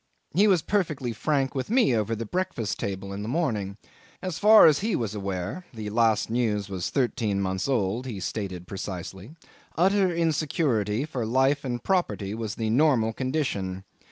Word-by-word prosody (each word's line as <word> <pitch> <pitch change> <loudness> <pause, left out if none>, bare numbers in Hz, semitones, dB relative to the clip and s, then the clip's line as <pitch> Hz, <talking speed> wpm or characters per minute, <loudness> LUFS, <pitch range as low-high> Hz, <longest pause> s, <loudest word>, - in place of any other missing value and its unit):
He 200 +7 +4
was 180 -6 +3
perfectly 155 - -1
frank 135 +3 0
with 130 +3 -3
me 230 - +3
over 110 +1 0
the 115 +1 -4
breakfast 115 - -2
table 100 0 -4
in 100 - -5
the 105 - -5
morning. 110 - -1 0.4
As 185 -5 -4
far 215 +1 +8
as 150 -3 +5
he 215 -1 0
was 110 -3 -2
aware 100 - -4
(the 105 -2 -5
last 110 -1 +2
news 110 -4 -1
was 95 -3 -3
thirteen 115 -6 0
months 95 +2 -1
old, 120 -1 0
he 110 -6 -5
stated 95 -2 -4
precisely), 95 - -7 0.4
utter 190 +2 +3
insecurity 145 - 0
for 135 -6 -4
life 135 +5 +2
and 120 -3 -3
property 175 - 0
was 110 -1 -4
the 110 -1 -1
normal 120 -4 +3
condition. 110 -9 -2
115 Hz, 165 wpm, -26 LUFS, 100-155 Hz, 0.4 s, far